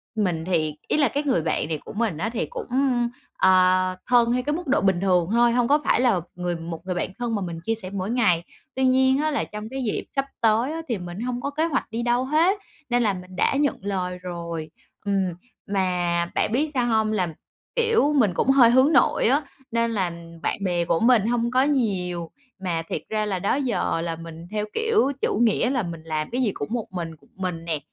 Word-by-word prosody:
mình 180 -7 0
thì 160 -4 0
ý - - +1
là 285 -4 +4
cái 290 +4 -1
người 255 - +1
bạn 155 - -1
này 160 -1 -2
của - - -8
mình 215 -6 -1
á 195 +8 -1
thì 235 - -1
cũng, 485 -1 -7 0.7
ờ, 185 0 +4
thân 240 -2 +4
theo 250 0 0
cái 295 +1 0
mức 350 -1 -5
độ 275 +2 +2
bình 190 -2 +2
thường 180 -3 +2
thôi, 235 +1 +4
hông 240 0 +2
có 290 +3 +4
phải - - +3
là 225 -9 +3
người 180 -1 -2
1 165 +1 -7
người 185 - -2
bạn 175 - -1
thân 235 -2 -1
mà 205 - -2
mình 170 -3 -4
chia 225 +6 -1
sẻ 195 -4 -4
mỗi 195 0 -3
ngày. 205 -9 +2 0.3
Tuy 265 - 0
nhiên 260 +1 +4
á 310 0 +1
là 290 - 0
trong 210 +1 -7
cái 265 0 -4
dịp 220 - -1
sắp 275 0 +1 0.2
tới 230 +4 +3
á 325 - -4
thì 235 - -1
mình 175 +1 -7
hông 245 0 -3
có 280 - -2
kế 310 +3 0
hoạch 280 -6 -1
đi 230 +1 -2
đâu 240 +1 +1
hết, 325 +8 +3 0.3
nên 245 0 +2
là 210 -3 +2
mình 185 0 -9
đã 185 - +2
nhận 285 0 +1
lời 185 -2 -2
rồi. 170 -3 -6 0.3
Ừm, 195 -3 0 0.3
mà 180 -3 0
bạn - - +1
biết 285 +7 +1
sao 250 -3 +1
hông, 220 -2 +2
là, 185 -4 +1 0.5
kiểu, 455 - +3
mình 225 -10 +3
cũng 215 - 0
hơi 265 -3 +7
hướng 260 +6 +5
nội - - +4
á, 275 +5 +3 0.3
nên 230 0 +1
là 190 -6 0 0.3
bạn 200 - -2
bè 175 -2 0
của 165 - +1
mình 230 -3 +4
hông 235 0 0
có 255 +1 +4
nhiều. 185 - 0 0.3
Mà 175 -4 -1
thiệt - - -2
ra 215 -1 0
là 195 -3 -1
đó 200 - +1
giờ 260 -10 0
là 165 -1 -2
mình 165 +1 -10
theo 210 0 -1
kiểu 450 - +2
chủ - - 0
nghĩa 235 +2 +3
là 255 -4 0
mình 165 -3 -6
làm 155 -1 -3
cái 250 +2 0
gì 230 -5 +2
cũng 145 - -5
một 235 -3 -1
mình, 170 -3 -4
một 155 - -17
mình 180 -3 -4
nè, 160 -3 -1
210 Hz, 235 wpm, -24 LUFS, 180-250 Hz, 0.7 s, hơi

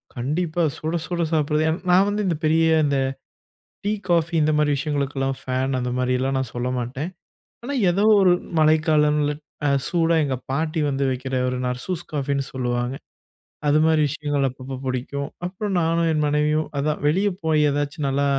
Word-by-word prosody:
கண்டிப்பா. 155 +7 -1
சுட 160 +2 -3
சுட 175 -1 -2
சாப்பிடுறது 150 0 +1
ஏன்னா 160 +2 -2
நான் 190 +3 +5
வந்து 210 +1 -1
இந்த 170 - +1
பெரிய, 160 +1 +3 0.2
இந்த 140 -1 +1 0.9
டீ, 205 - 0 0.2
காஃபி 170 -1 +2
இந்த 155 +1 +3
மாரி 150 -1 +2
விஷயங்களுக்கெல்லாம் 140 -2 -1
ஃபேன் 130 +1 -1
அந்த 125 0 -2
மாரி 125 0 +1
எல்லாம் 135 +1 0
நான் 130 -3 -3
சொல்ல 120 +1 -1
மாட்டேன். 130 +7 -4 0.5
ஆனா 280 +4 -4 0.2
ஏதோ 195 +4 +1 0.2
ஒரு 185 -2 +5 0.3
மழைக்காலங்கள்ல, 150 -1 +3 0.3
அ - - +3 0.2
சூடா 165 -1 +2
எங்க 135 -2 -1 0.2
பாட்டி 155 +3 -1
வந்து 135 0 -1
வக்கிற 130 +1 -3
ஒரு 125 - -2
நர்சூஸ் 140 +8 -3
காஃபின்னு 140 -2 -1
சொல்லுவாங்க. 125 0 -1 0.7
அதுமாரி 155 +1 +4
விஷயங்கள் 145 -1 -1
அப்பப்போ 130 +1 -8
புடிக்கும். 130 +2 -3 0.2
அப்புறம் 195 +2 -3
நானும் 165 0 +1
என் 150 - +1
மனைவியும் 150 +1 +1
அதான் 150 +2 -1
வெளியே 195 +6 +2
போய் 155 -2 +3
எதாச்சும் 145 0 -2
நல்லா 140 +1 +1
150 Hz, 160 wpm, -23 LUFS, 135-160 Hz, 0.9 s, நான்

